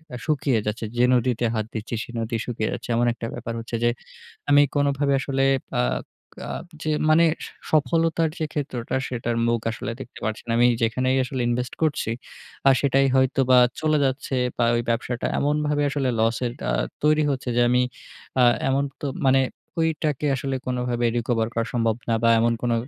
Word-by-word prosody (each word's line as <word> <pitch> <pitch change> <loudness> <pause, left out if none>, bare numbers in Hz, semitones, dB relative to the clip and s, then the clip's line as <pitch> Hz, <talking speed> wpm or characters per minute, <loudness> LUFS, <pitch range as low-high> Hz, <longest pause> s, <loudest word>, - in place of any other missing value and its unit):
এ - - -4
শুকিয়ে 140 -6 +1
যাচ্ছে। 110 +2 -2
যে 120 - +4
নদীতে 125 -1 +1
হাত 110 -1 -1
দিচ্ছি, 110 +1 -4
সে - - -13
নদী 115 +1 -2
শুকিয়ে 110 -3 -2
যাচ্ছে। - - -7
এমন 120 +1 +2
একটা 115 -1 -6
ব্যাপার 115 - -5
হচ্ছে 115 +1 -5
যে, 120 - +4 0.6
আমি 145 0 +7
কোনভাবে 140 0 +1
আসলে 135 0 -1 0.4
আ - - +3 0.7
আ - - -5 0.3
যে 155 - -1 0.2
মানে 160 +2 +6 0.2
স - - -9 0.2
সফলতার 160 +2 +2
যে 160 - -1
ক্ষেত্রটা, 130 -5 -3
সেটার 120 -1 -2
মুখ 115 0 +1
আসলে 115 +1 -5
দেখতে - - -9
পারছি 110 -1 -3
না। 115 - -1
আমি 120 - +6 0.2
যেখানেই 130 +3 +1
আসলে 130 0 -4
ইনভেস্ট 120 0 -2
করছি, 155 -7 0 0.6
আ - - +8
সেটাই 135 0 +3
হয়তো 130 0 +3
বা 125 - +8 0.2
চলে 155 -1 +2
যাচ্ছে, 135 0 -2 0.2
বা 120 - +2
ঐ - - +2
ব্যবসাটা 120 +1 -1
এমনভাবে 150 0 +1
আসলে 135 -2 -1
লসের 115 +2 0 0.2
আ - - +1 0.3
তৈরি 155 0 +4
হচ্ছে 130 -2 -3
যে - - +4
আমি 125 +1 +3 0.6
আ - - +7 0.2
এমন 135 +1 +2 0.2
তো 145 - -3 0.2
মানে, 135 0 +5 0.4
ঐটাকে 155 -3 0
আসলে 135 +1 -2
কোনভাবে 125 -1 -1
রিকভার 115 -1 0
করা 115 -1 0
সম্ভব 115 -2 +1
না, 115 - +2
বা 115 - +4
এমন 115 0 +3
কোনো 120 -1 +1
125 Hz, 180 wpm, -24 LUFS, 115-140 Hz, 0.7 s, আ